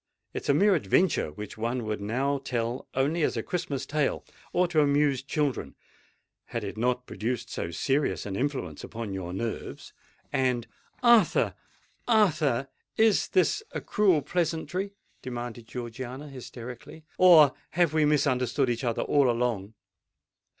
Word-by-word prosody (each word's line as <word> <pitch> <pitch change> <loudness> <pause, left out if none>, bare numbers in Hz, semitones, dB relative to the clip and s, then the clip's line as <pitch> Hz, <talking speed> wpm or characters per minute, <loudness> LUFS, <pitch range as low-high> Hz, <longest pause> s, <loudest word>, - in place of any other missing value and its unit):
It - - -3
is - - -4
a 140 - +5
mere 200 +5 +5
adventure 160 - +2
which 105 +7 -8
one 120 +2 -1
would 105 -1 -3
now 135 +7 0
tell 120 -2 -3
only 145 +6 +1
as - - +1
a - - -1
Christmas 145 -7 -3
tale—or 155 +4 -1
to 160 -3 +3
amuse 140 -2 +2
children,—had 135 - -5
it 100 - -5
not 125 +2 0
produced 120 +1 -3
so 85 - -3
serious 135 - 0
an 100 -2 -4
influence 125 - -3
upon 115 -3 -5
your 90 -2 -4
nerves, 110 +5 -5 0.4
and——" 125 -3 +1 0.4
"Arthur! 235 -2 +5 0.5
Arthur! 155 - +2 0.3
is 220 -2 +4
this 185 - +2
a - - -2
cruel 185 -8 +2
pleasantry?" 175 +4 -2 0.3
demanded 120 -2 -6
Georgiana 125 +4 -6
hysterically; 125 +3 -9
"or 165 -6 +8 0.2
have 170 -2 +2
we 155 -1 +3
misunderstood 135 -3 +2
each 120 +2 -3
other 120 -2 0
all 140 -3 +3
along?" 115 -4 -1
135 Hz, 135 wpm, -28 LUFS, 120-155 Hz, 0.5 s, or